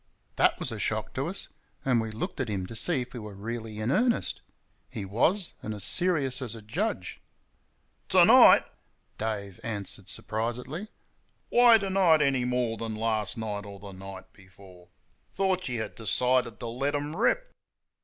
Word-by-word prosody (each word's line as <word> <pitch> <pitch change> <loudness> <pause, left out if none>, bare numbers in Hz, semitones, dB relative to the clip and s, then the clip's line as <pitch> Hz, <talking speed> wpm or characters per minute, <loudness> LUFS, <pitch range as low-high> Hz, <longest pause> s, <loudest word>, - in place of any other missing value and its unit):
That - - +3
was - - -3
a - - -5
shock - - -1
to - - -2
us, - - -3 0.4
and 125 -4 +3
we 110 - -4
looked 150 - -5
at 130 -4 -2
him 95 -3 -2
to 115 - -9
see 135 +4 +2
if 125 0 -8
he 125 - -7
were 105 -2 -9
really 110 +1 -6
in 110 +4 -1
earnest. 240 - +1 0.5
He 100 - -6
was, 160 - +1
and 110 0 -5
as 100 - -2
serious 145 - +2
as 115 -3 -1
a 110 - -10
judge. 105 - -3 0.9
"TO - - +6
NIGHT!" - - +8 0.5
Dave 100 -4 -4
answered, 105 -4 -3
surprisedly 125 - -2 0.6
"why 240 -1 +7
to 195 -2 -3
night 170 -5 +4
any 135 -3 +1
more 125 -2 -1
than 115 -1 -4
last 110 -1 -1
night 105 -2 -4
or 100 -1 -10
the 100 0 -9
night 95 0 -10
before? 95 -2 -17 0.4
Thought 185 -5 0
you 120 -2 -3
had - - -8
decided 125 0 0
to - - -5
let 130 +5 -2
them 145 +2 -3
rip?" - - +1
115 Hz, 175 wpm, -28 LUFS, 105-145 Hz, 0.9 s, NIGHT